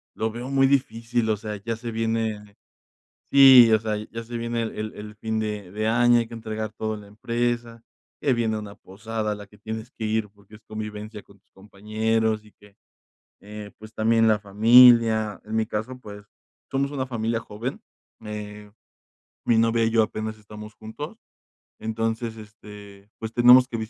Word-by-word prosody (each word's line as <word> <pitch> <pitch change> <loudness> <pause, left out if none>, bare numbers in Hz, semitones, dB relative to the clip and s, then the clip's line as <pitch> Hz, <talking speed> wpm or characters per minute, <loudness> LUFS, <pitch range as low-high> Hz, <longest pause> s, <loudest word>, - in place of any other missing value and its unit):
lo 110 - -1
veo 120 +3 -7
muy 135 -1 +4
difícil, 120 -3 0
o 105 - 0
sea, 105 +1 -6
ya 115 +3 -4
se 120 +2 -7
viene 110 -2 -2 0.8
sí, 130 -4 +9
o 110 - +5
sea, 110 0 -2
ya 110 +2 -7
se 120 +1 -6
viene 115 0 -2
el 115 - -3
el 110 0 -4
el 105 0 -10
fin 110 +1 -3
de 105 -4 -4
de 110 +2 -2
año, 120 +1 +4
hay 115 - -2
que 115 - -9
entregar 110 -1 -5
todo 110 0 -3
en 105 - -7
la 100 - -14
empresa, 115 +2 -3 0.4
que 140 -3 +2
viene 110 -2 0
una 105 -1 -9
posada 110 +2 -5
a - - -2
la 105 0 -11
que 105 - -20
tienes 110 +2 -6
que 110 - -6
ir 110 -1 -1
porque 100 +1 -24
es 105 - -16
convivencia 105 0 -7
con 100 0 -21
tus 95 - -47
compañeros, 110 +2 -1
y 105 - -18
que, 105 -1 -21 0.7
eh, 105 0 -9
pues, 110 0 -12
también 115 +1 +3
la 110 -1 +4
familia, 110 +1 +5
en 110 +1 -6
mi 110 0 +1
caso, 110 +5 -4
pues, 105 -3 -11 0.4
somos 140 +1 -1
una 135 -2 -3
familia 115 -2 -1
joven, 115 +3 -6 0.4
eh, 105 -1 -8 0.8
mi 115 - +4
novia 115 0 +3
y 115 - +2
yo 115 -1 +4
apenas 110 0 -5
estamos 105 0 -11
juntos. 145 - -8 0.6
Entonces, 115 +1 -3
este, 105 -2 -13
pues, 110 0 -6
tenemos 125 +2 +7
que 115 - -4
110 Hz, 185 wpm, -24 LUFS, 105-115 Hz, 0.8 s, sí